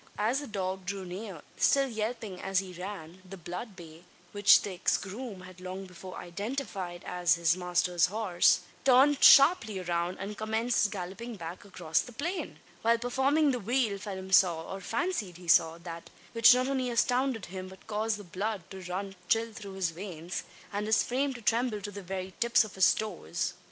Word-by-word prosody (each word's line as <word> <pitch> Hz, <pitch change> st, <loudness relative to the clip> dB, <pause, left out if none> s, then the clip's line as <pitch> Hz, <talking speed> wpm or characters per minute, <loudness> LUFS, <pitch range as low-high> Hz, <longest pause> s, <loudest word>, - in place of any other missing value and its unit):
As 225 Hz, +6 st, +1 dB
the 290 Hz, -, -7 dB
dog 190 Hz, -2 st, -4 dB
drew 195 Hz, -1 st, -3 dB
near, 185 Hz, -2 st, -7 dB
still 275 Hz, -1 st, +3 dB
yelping 220 Hz, -4 st, -4 dB
as 195 Hz, 0 st, -1 dB
he 185 Hz, -1 st, -1 dB
ran, 180 Hz, -1 st, -8 dB
the 190 Hz, +1 st, -10 dB
blood 180 Hz, +5 st, -7 dB
bay 165 Hz, -2 st, -12 dB, 0.3 s
which 205 Hz, 0 st, +6 dB
the 200 Hz, -, -4 dB
ex 180 Hz, -, +1 dB
groom 205 Hz, 0 st, -7 dB
had 185 Hz, 0 st, -13 dB
long 185 Hz, +1 st, -6 dB
before 185 Hz, 0 st, -10 dB
identified 195 Hz, -2 st, -5 dB
as 180 Hz, -1 st, +2 dB
his 170 Hz, 0 st, +2 dB
master's 180 Hz, -1 st, +1 dB
horse 195 Hz, -3 st, +3 dB, 0.2 s
turned 270 Hz, +2 st, +5 dB
sharply 275 Hz, -, +7 dB
round, 175 Hz, 0 st, -2 dB
and 205 Hz, +2 st, -5 dB
commenced 220 Hz, 0 st, +1 dB
galloping 200 Hz, +5 st, -6 dB
back 170 Hz, +1 st, -8 dB
across 175 Hz, -5 st, -1 dB
the 245 Hz, -, -11 dB
plain! 340 Hz, +10 st, -4 dB, 0.2 s
While 230 Hz, +1 st, +3 dB
performing 270 Hz, +5 st, +2 dB
the 250 Hz, -, -2 dB
wheel, 230 Hz, -2 st, 0 dB
Phelim 190 Hz, -2 st, -7 dB
saw 175 Hz, -3 st, +5 dB
or 195 Hz, -, -6 dB
fancied 225 Hz, -, -2 dB
he 180 Hz, -1 st, -13 dB
saw 165 Hz, 0 st, +4 dB
that, 170 Hz, -1 st, -9 dB, 0.2 s
which 230 Hz, +1 st, +7 dB
not 255 Hz, +1 st, +1 dB
only 260 Hz, -2 st, -1 dB
astounded 245 Hz, -1 st, +1 dB
him, 185 Hz, +1 st, -7 dB
but 190 Hz, 0 st, -14 dB
caused 215 Hz, 0 st, -1 dB
the 205 Hz, -, -9 dB
blood 195 Hz, +2 st, -3 dB
to 190 Hz, -1 st, -8 dB
run 195 Hz, +1 st, -4 dB
chill 225 Hz, 0 st, +1 dB
through 205 Hz, -3 st, -9 dB
his 190 Hz, -3 st, -1 dB
veins, 175 Hz, -1 st, -6 dB, 0.3 s
and 205 Hz, +1 st, -2 dB
his 220 Hz, -, +4 dB
frame 265 Hz, +2 st, -1 dB
to 240 Hz, -, -10 dB
tremble 230 Hz, -1 st, +1 dB
to 205 Hz, +1 st, -6 dB
the 200 Hz, 0 st, -7 dB
very 190 Hz, 0 st, -5 dB
tips 235 Hz, 0 st, +4 dB
of 215 Hz, -, -9 dB
his 190 Hz, -, +5 dB
toes. 215 Hz, 0 st, -3 dB
200 Hz, 185 wpm, -30 LUFS, 180-230 Hz, 0.3 s, sharply